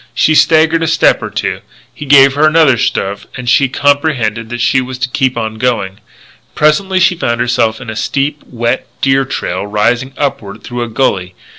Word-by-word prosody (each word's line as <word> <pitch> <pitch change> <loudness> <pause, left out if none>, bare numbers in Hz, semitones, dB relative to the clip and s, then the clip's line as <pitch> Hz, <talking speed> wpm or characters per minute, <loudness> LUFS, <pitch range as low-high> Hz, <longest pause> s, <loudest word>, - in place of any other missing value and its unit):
She 155 - +2
staggered 160 +1 +3
a 165 - 0
step 160 - +2
or - - -5
two; - - -3 0.3
he 150 - -9
gave 135 -1 +6
her 150 +2 +3
another 155 -4 +4
shove 100 -2 -2
and 125 -1 -7
she 135 +2 +3
comprehended 130 -6 0
that 120 0 -5
she 130 +2 +2
was 130 0 -6
to 125 0 -2
keep 130 -1 -1
on 110 -1 -4
going. 110 -6 -2 0.6
Presently 185 +5 +2
she 185 0 +3
found 120 -9 -2
herself 115 -2 0
in 125 - -10
a 110 - -6
steep, 140 +5 -2
wet 120 +1 -2
deer 135 0 +2
trail 100 -7 -4
rising 115 +5 0
upward 105 -7 -4
through 120 0 -5
a 120 - -3
gully. 95 -6 -1
125 Hz, 185 wpm, -13 LUFS, 115-145 Hz, 0.6 s, gave